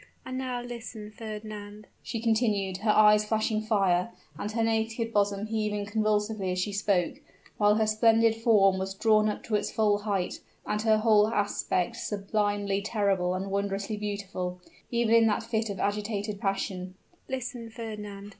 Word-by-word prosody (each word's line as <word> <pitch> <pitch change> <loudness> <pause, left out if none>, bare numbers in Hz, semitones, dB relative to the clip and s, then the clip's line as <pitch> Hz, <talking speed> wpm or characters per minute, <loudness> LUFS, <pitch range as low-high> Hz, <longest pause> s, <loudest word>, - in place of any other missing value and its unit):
and 255 - -5
now 255 -2 -3
listen 230 -3 -8
Fernand," 215 -1 -8 0.2
she 230 - -4
continued, 215 -4 +1
her 215 +3 -2
eyes 210 0 +6
flashing 215 0 0
fire, 195 -3 +2 0.3
and 200 +7 -4
her 230 0 +1
naked 225 +1 -1
bosom 205 0 +1
heaving 215 -2 -2
convulsively 210 -2 0
as 180 - -2
she 200 +3 -1
spoke, 195 -3 +1 0.4
while 210 0 +5
her 220 0 +2
splendid 225 +1 +4
form 205 -4 +4
was 190 0 -3
drawn 215 0 +3
up 210 - -4
to 225 - -6
its 210 -1 +1
full 210 -2 +2
height, 200 -3 -2 0.3
and 210 - -1
her 220 -1 +4
whole 215 -1 +4
aspect 205 -1 0
sublimely 205 -2 -1
terrible 200 -4 0
and 195 +1 -4
wondrously 200 +1 -1
beautiful, 200 -3 -4 0.3
even 235 -1 +1
in 230 -1 +6
that 215 +1 +1
fit 225 -1 -1
of 195 -2 -5
agitated 205 0 -2
passion 190 -2 -2 0.3
"listen, 250 -3 -4
Fernand!" 210 -3 -7
210 Hz, 155 wpm, -28 LUFS, 200-225 Hz, 0.4 s, eyes